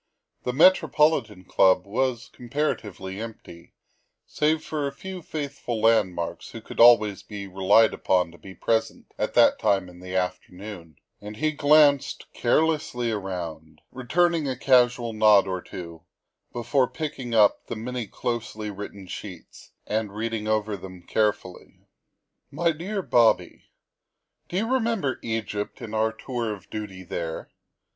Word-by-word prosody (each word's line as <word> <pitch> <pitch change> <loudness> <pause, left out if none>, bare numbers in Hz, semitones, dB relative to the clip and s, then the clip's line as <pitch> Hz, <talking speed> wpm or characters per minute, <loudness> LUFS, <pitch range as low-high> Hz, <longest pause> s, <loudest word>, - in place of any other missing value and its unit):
The 125 - 0
Metropolitan 150 - +3
Club 95 0 +3
was 125 +3 -2
comparatively 110 - -3
empty 105 -7 -10 0.5
save 155 +1 0
for 150 -2 -2
a - - -4
few 185 +6 -8
faithful 140 -7 -5
landmarks 105 -7 +1
who - - -8
could - - -11
always 110 -4 +6
be 105 -2 -8
relied 95 +4 +4
upon 90 -3 +1
to 85 - -17
be 95 +4 -12
present 115 0 -2
at - - -2
that - - +5
time 95 -2 +1
in 90 0 -14
the 90 +1 -7
afternoon, 90 -2 -5 0.2
and 105 +1 -8
he 155 +1 +1
glanced 145 -1 +4
carelessly 125 -3 +1
around, 85 -6 -6
returning 160 +5 +1
a 130 - -3
casual 125 -3 +3
nod 105 -2 +5
or 95 -1 -3
two, 85 -3 -9 0.5
before 120 +2 +1
picking 135 -7 -5
up 105 -2 +4
the - - -4
many 120 +1 -4
closely 110 -2 -4
written 100 -1 -8
sheets 90 -1 -10 0.2
and 105 -1 -2
reading 110 0 -3
them 110 - +2
over 100 -4 -4
carefully. 105 -4 -2 0.6
"My 170 +4 +1
DEAR 190 +5 -4
BOBBT: 120 -6 +2 0.8
Do 180 - -3
you 220 +3 0
remember 225 - 0
Egypt 110 -2 -4
and 115 -4 -8
our 110 0 +1
tour 115 0 -4
of 100 -3 -10
duty 100 -3 -6
there? 85 -2 -5
110 Hz, 135 wpm, -25 LUFS, 95-130 Hz, 0.8 s, always